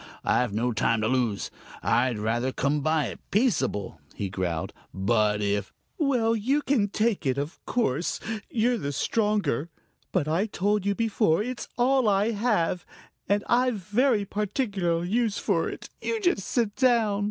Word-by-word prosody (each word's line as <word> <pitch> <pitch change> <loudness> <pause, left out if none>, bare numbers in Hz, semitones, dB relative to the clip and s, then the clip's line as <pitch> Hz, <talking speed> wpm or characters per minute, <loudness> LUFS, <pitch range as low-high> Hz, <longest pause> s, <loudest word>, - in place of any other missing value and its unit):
I've 125 -3 +2
no 115 +4 0
time 115 0 +1
to 110 - +1
lose. 120 -5 0 0.3
I'd 120 -1 +2
rather 115 +5 0
come 140 +3 0
by 155 0 +1
it - - -8
peaceable," 135 - 0
he 100 - -3
growled, 90 -4 -3 0.2
"but 105 +1 +1
if 100 -1 -1 0.2
" - - -46
"Well, 245 -7 +2
you 265 +7 +1
can 240 -8 +2
take 215 0 0
it; 130 0 +1
of 145 +5 -4
course, 170 - 0 0.3
you're 240 +1 +1
the 145 -4 -3
stronger. 205 - 0 0.4
But 150 - 0
I 170 +7 +1
told 205 0 0
you 200 - +2
before, 210 -5 +2
it's 250 +1 -5
all 255 -1 +3
I 205 +3 +2
have, 205 -6 0 0.5
and 205 0 +2
I've 250 0 +3
very 210 +3 +1
particular 200 -5 -1
use 220 +2 0
for 175 -5 0
it. - - -8
You 455 - -1
just 350 - +1
sit 225 -5 0
down!" 230 -6 +3
200 Hz, 160 wpm, -26 LUFS, -, 0.5 s, all